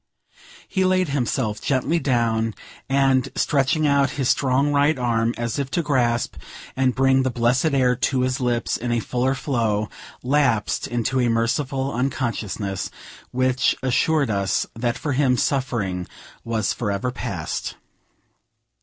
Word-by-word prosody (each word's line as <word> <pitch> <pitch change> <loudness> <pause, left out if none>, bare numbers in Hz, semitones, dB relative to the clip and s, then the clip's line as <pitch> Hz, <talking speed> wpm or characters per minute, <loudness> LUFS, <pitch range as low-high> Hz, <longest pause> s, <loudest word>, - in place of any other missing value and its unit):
He 190 - 0
laid 185 -2 +2
himself 125 -5 -1
gently 140 +5 +1
down; 115 -5 0 0.3
and, 135 -1 +3
stretching 145 +2 +1
out 140 -1 +3
his 135 -3 +1
strong 140 +2 +2
right 145 +2 +3
arm, 115 -2 0
as 120 +3 -2
if 140 -2 -2
to 170 - 0
grasp 120 - 0 0.4
and 130 -1 +1
bring 135 0 +4
the 130 - +1
blessed 120 +3 +1
air 125 -2 +3
to 130 0 0
his 130 0 0
lips 120 -2 0
in 120 +1 -3
a 120 - +2
fuller 125 +4 0
flow, 110 -6 -1 0.3
lapsed 130 -5 +1
into 120 +2 -1
a 120 -1 +2
merciful 130 +4 0
unconsciousness, 115 -6 -2 0.4
which 130 0 +1
assured 140 +1 +2
us 100 -2 0
that 120 +1 -2
for 145 - -3
him 130 -2 +2
suffering 110 -11 -1 0.4
was 110 -3 -1
forever 105 +2 -2
past. - - -4
125 Hz, 135 wpm, -23 LUFS, 115-135 Hz, 0.4 s, bring